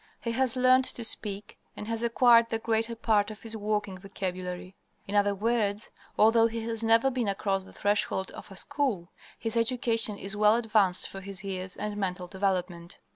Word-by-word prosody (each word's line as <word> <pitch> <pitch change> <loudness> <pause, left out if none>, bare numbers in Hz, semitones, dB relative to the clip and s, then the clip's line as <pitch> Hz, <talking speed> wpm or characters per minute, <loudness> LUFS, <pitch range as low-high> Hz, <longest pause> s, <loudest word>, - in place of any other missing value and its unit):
He 230 - -3
has 255 0 0
learned 255 +1 +4
to 240 - -3
speak 205 -2 -2 0.2
and 210 - -6
has 230 0 -1
acquired 235 0 +4
the 225 - -1
greater 225 +1 -1
part 215 -2 +1
of 215 -1 -10
his 225 -1 -5
working 210 -3 -2
vocabulary. 185 -1 -6 0.3
In 200 - -5
other 205 -1 +2
words, 210 -1 -1 0.3
although 225 +1 +5
he 230 0 -5
has 225 0 0
never 230 +4 +4
been 245 -3 -2
across 195 -1 -1
the - - -15
threshold 205 -2 0
of - - -11
a 195 - -11
school, 200 -6 -1 0.3
his 225 0 -3
education 230 -2 +1
is 195 +1 -4
well 210 +1 +4
advanced 215 -6 +3
for 195 - -9
his 195 +1 -7
years 185 -1 -5
and 210 0 -4
mental 180 -2 -3
development. 180 -2 -3
210 Hz, 180 wpm, -28 LUFS, 195-230 Hz, 0.3 s, although